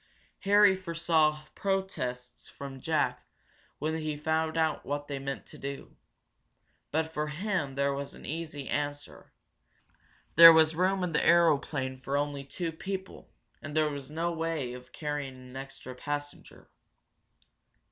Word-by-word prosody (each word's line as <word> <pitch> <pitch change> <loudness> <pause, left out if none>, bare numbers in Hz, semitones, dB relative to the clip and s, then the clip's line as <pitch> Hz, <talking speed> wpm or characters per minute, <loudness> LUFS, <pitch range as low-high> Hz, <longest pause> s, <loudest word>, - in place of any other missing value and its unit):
Harry 205 -1 +6
foresaw 165 -4 +1
protests 130 -11 -3
from 135 -2 -8
Jack 160 +2 0 0.5
when 155 +2 -1
he 155 -1 -3
found 160 +1 0
out 160 -1 +1
what 145 0 -3
they 140 -1 -4
meant 135 0 -5
to - - -13
do, 140 0 -7 0.9
but 160 +1 -1
for 150 0 -1
him 155 -3 -2
there 140 0 +1
as 140 - -6
an - - -12
easy 155 -3 -5
answer 145 0 -4 1.0
there 165 0 +12
was 160 -1 +5
room 185 +3 +1
in 180 - -1
the 150 - +1
aeroplane 145 -6 +3
for 135 +2 -1
only 145 -1 -2
two 165 +4 -4
people, 190 +3 -6 0.3
and 155 +1 -5
there 155 -1 +3
was 140 -1 -7
no 165 +3 -1
way 160 -6 -2
of 125 0 -11
carrying 145 -3 -4
an 130 0 -13
extra 135 -1 -8
passenger. 145 +3 -6
150 Hz, 140 wpm, -30 LUFS, 140-165 Hz, 1.0 s, there